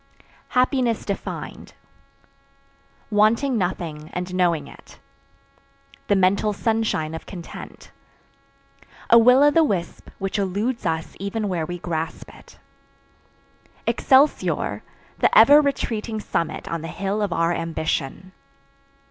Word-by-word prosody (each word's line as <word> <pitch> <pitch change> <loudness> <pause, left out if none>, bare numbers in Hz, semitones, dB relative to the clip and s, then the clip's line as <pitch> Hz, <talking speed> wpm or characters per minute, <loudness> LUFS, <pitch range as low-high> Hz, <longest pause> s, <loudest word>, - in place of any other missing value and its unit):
HAPPINESS 250 -3 +1
DEFINED. 200 - -6 1.4
Wanting 225 +6 +3
nothing 170 -6 -3
and 180 +1 -4
knowing 170 -5 +1
it. - - -15 1.1
The 205 - +3
mental 195 +3 +2
sunshine 220 -8 -1
of 160 - -8
content. 175 -4 -10 1.2
A 235 - +9
"will 250 +4 +6
o' 295 - +6
the 325 +2 +4
wisp" 185 - -3
which 195 +2 -3
eludes 205 +3 -1
us 160 0 -3
even 205 +2 -3
when 170 -5 -2
we 175 0 -5
grasp 165 -2 -5
it. - - -17 1.3
Excelsior! 275 +2 +2 0.4
The - - +3
ever 285 +7 +8
retreating 225 -6 -2
summit 165 -5 -3
on 165 -1 -3
the 165 - -6
hill 200 +4 -3
of 205 -3 -1
our 165 0 +1
ambition. 165 0 -3
195 Hz, 115 wpm, -23 LUFS, 170-225 Hz, 1.4 s, A